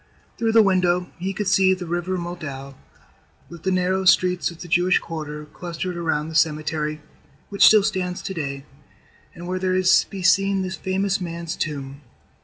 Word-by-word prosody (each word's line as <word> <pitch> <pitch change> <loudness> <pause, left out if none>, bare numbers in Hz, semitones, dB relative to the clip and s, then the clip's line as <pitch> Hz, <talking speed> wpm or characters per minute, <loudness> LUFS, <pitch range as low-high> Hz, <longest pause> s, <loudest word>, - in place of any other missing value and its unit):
Through 225 -1 +1
the 225 -1 +7
window 180 -2 +1
he 190 +2 -2
could 195 +1 -3
see 190 0 +4
the 180 -1 -7
River 175 +2 -2
Moldau 155 -6 -6 0.8
with 170 -1 -11
the 190 - -1
narrow 185 +1 +1
streets 180 -1 +3
of 170 -1 -12
the 175 - -8
Jewish 175 +2 +3
quarter 150 -2 -6
clustered 175 +3 -6
around 160 -3 -1
the - - -8
cemetery, 155 -1 0 0.5
which 200 - +6
still 215 -2 +6
stands 185 -3 -2
to 190 - -4
day, 140 -4 -5 0.7
and 170 - -9
where 185 +1 -3
is 185 0 +4
to - - -23
be 195 -2 -7
seen 195 +1 +3
this 185 0 -4
famous 190 +3 -1
man's 170 -1 -5
tomb. 140 -2 -5
180 Hz, 175 wpm, -22 LUFS, 160-190 Hz, 0.8 s, the